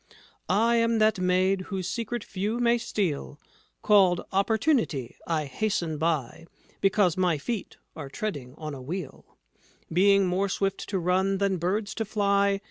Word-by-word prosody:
"I 230 +5 +3
am 230 0 +2
that 215 -2 +3
maid 185 +1 +2
whose 190 -3 -3
secret 235 +2 -3
few 205 +4 -3
may 240 0 +3
steal, 160 -10 -3 0.4
Called 195 -4 +5
Opportunity. 210 - +1
I 160 -3 0
hasten 165 0 -2
by 160 -1 -2 0.3
Because 195 -3 +2
my 180 -4 +2
feet 210 +8 -5 0.2
are 145 -4 -7
treading 140 -7 -5
on 155 -2 -6
a 135 - -8
wheel, 155 +1 -7 0.6
Being 195 +2 +5
more 185 +2 0
swift 195 0 -2
to 195 - -1
run 190 +2 +1
than 195 -1 +1
birds 195 +4 -1
to 225 - -2
fly. 200 -1 +1
195 Hz, 145 wpm, -27 LUFS, 170-210 Hz, 0.6 s, Called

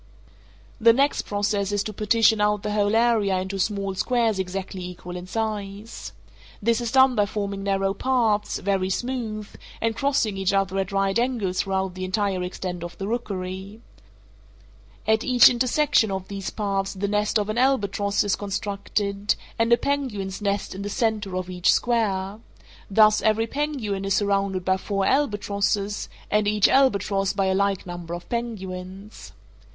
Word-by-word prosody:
The 230 0 +6
next 275 +4 +1
process 205 -1 0
is 205 -1 0
to 215 - -5
partition 220 +1 +3
out 210 -1 +1
the 210 - -2
whole 205 0 +1
area 225 -5 +3
into 190 +1 -4
small 195 0 -1
squares 225 0 +1
exactly 190 0 -4
equal 180 0 -8
in 180 0 -7
size. 210 0 -4 0.5
This 230 +3 +1
is 235 -1 -2
done 260 -1 +6
by 205 -3 +2
forming 200 -1 -3
narrow 195 0 0
paths, 225 -3 +1
very 190 -1 0
smooth, 220 -1 -3 0.3
and 225 0 0
crossing 250 -6 0
each 195 0 0
other 195 -1 +1
at 195 +1 -2
right 195 +2 +1
angles 230 -7 -1
throughout 190 -1 -2
the 185 +1 -6
entire 190 0 0
extent 180 -1 -5
of 175 - -8
the 195 - -4
rookery. 195 -3 -4 1.3
At 220 +1 +2
each 250 -1 +7
intersection 255 0 +2
of 190 -1 -4
these 195 -1 -4
paths 195 -2 -2
the 200 +2 -2
nest 210 +2 +1
of 205 -1 -1
an 215 +3 -1
albatross 205 -6 +1
is 205 -2 +1
constructed, 200 0 -2 0.2
and 230 +1 +2
a 235 - +7
penguin's 225 -10 -2
nest 200 0 -1
in 190 - -7
the 205 - -4
centre 215 -4 -1
of 185 -1 -3
each 180 -1 +2
square—thus 215 -1 +1
every 220 +1 +2
penguin 245 -7 -2
is 195 -1 +1
surrounded 195 -2 0
by 190 0 +2
four 195 0 -2
albatrosses, 205 -5 0 0.2
and 210 0 +2
each 210 0 +4
albatross 200 -7 +2
by 195 -1 0
a 190 - +2
like 200 0 0
number 175 -1 -6
of 175 - -9
penguins. 195 -4 -6
205 Hz, 160 wpm, -24 LUFS, 195-225 Hz, 1.3 s, each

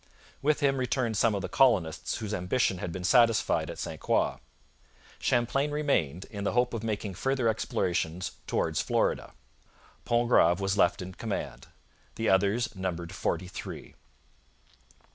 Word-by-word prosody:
With 150 +2 +1
him 135 -1 +2
returned 125 -2 0
some 110 +1 +3
of 100 - -3
the - - -2
colonists 100 -12 +2
whose 105 -1 -4
ambition 95 +1 0
had 85 - -4
been 90 +2 -6
satisfied 115 +3 +3
at - - -6
St - - -5
Croix. - - +1 0.8
Champlain 130 +4 +1
remained, 140 - 0
in 100 -2 -5
the 100 - 0
hope 125 +1 +2
of 115 -2 -3
making 105 -3 -3
further 130 +5 0
explorations 90 -5 -1 0.2
'towards - - 0
Florida.' - - 0 0.7
Pontgrave 120 -7 +3
was 95 0 0
left 90 -1 +2
in 95 +1 -8
command. 110 +1 -5 0.5
The 110 - 0
others 105 +4 +2
numbered 85 -3 -4
forty 90 +2 -2
three. 90 - -8
105 Hz, 145 wpm, -29 LUFS, 90-120 Hz, 0.8 s, some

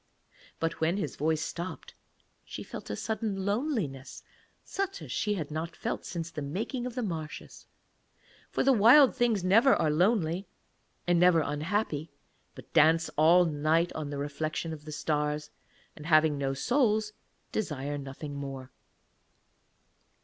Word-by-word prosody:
But 165 0 -2
when 165 +4 +2
his 205 - -3
voice 155 +1 0
stopped 175 +3 -6 0.5
she - - -8
felt - - -9
a - - -2
sudden 215 -2 -3
loneliness, 200 - -2 0.4
such 390 -1 -3
as - - -9
she 210 -1 0
had 155 -6 -5
not 160 +2 -4
felt - - -4
since 170 -2 -5
the 155 - -5
making 220 - -3
of 245 - -8
the 250 - -2
marshes; 160 -6 -6 0.8
for - - 0
the 270 - +5
Wild 250 +5 +7
Things 230 -6 +1
never 225 +9 +5
are 155 - +1
lonely 180 +1 +1 0.6
and 175 -1 +3
never 175 -2 +5
unhappy, 155 +2 -2 0.5
but - - -13
dance 160 +2 +4
all 170 +4 +6
night 160 +2 +1
on 155 -2 -4
the 145 - -4
reflection 155 +3 -3
of 150 -1 -10
the 155 - -7
stars, 150 0 -2 0.4
and 150 - -9
having 155 -2 +4
no 135 -1 -2
souls, 215 - +1 0.4
desire 145 -8 -3
nothing 140 +2 -7
more. 135 -2 -6
165 Hz, 145 wpm, -29 LUFS, 150-210 Hz, 0.8 s, Wild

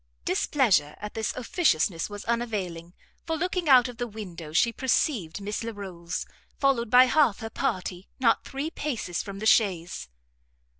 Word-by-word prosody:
Displeasure 190 - +2
at 210 0 -7
this 220 -1 -1
officiousness 210 - +1
was 205 0 -8
unavailing, 195 -8 -3 0.3
for 325 -1 -1
looking 365 -1 -1
out 255 -2 +7
of 245 -2 -9
the 245 -1 -2
window, 180 -8 -8
she 230 +9 +3
perceived 235 - 0
Miss 205 +2 -4
Larolles, 190 -6 -5 0.3
followed 260 -5 +2
by 250 +2 +8
half 260 -5 +3
her 225 0 -5
party, 185 -2 -3
not 235 -3 +3
three 280 +4 -4
paces 240 - -3
from 200 -1 -7
the 215 - -5
chaise. 185 - +2
220 Hz, 150 wpm, -27 LUFS, 185-255 Hz, 0.3 s, by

